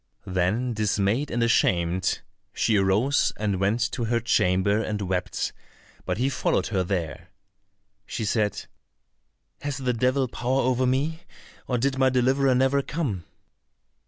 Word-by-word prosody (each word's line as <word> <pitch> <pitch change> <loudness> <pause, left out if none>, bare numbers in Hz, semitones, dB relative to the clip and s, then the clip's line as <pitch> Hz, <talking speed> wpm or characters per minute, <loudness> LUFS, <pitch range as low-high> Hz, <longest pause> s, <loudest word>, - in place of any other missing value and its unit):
Then 95 +7 0
dismayed 105 +5 0
and 115 0 0
ashamed, 90 -5 +1 0.3
she 110 - +1
arose 105 +8 +2
and 100 -3 -1
went 100 +5 +1
to 120 -3 -2
her 115 +1 +1
chamber 100 -2 +2
and 105 -2 -3
wept, 90 -1 -2 0.5
but - - -1
he 125 +3 +1
followed 135 - 0
her 95 - +2
there. 90 -1 -3 0.8
She 110 - -3
said, 105 -2 0 1.0
"Has 145 -1 -3
the 130 -2 -1
devil 130 +3 +1
power 125 +3 -1
over 130 0 +1
me, 145 +6 0 0.5
or 125 - 0
did 135 +2 0
my 130 0 +5
deliverer 130 +1 +2
never 135 +2 +3
come?" 135 - -3
115 Hz, 135 wpm, -25 LUFS, 100-130 Hz, 1.0 s, my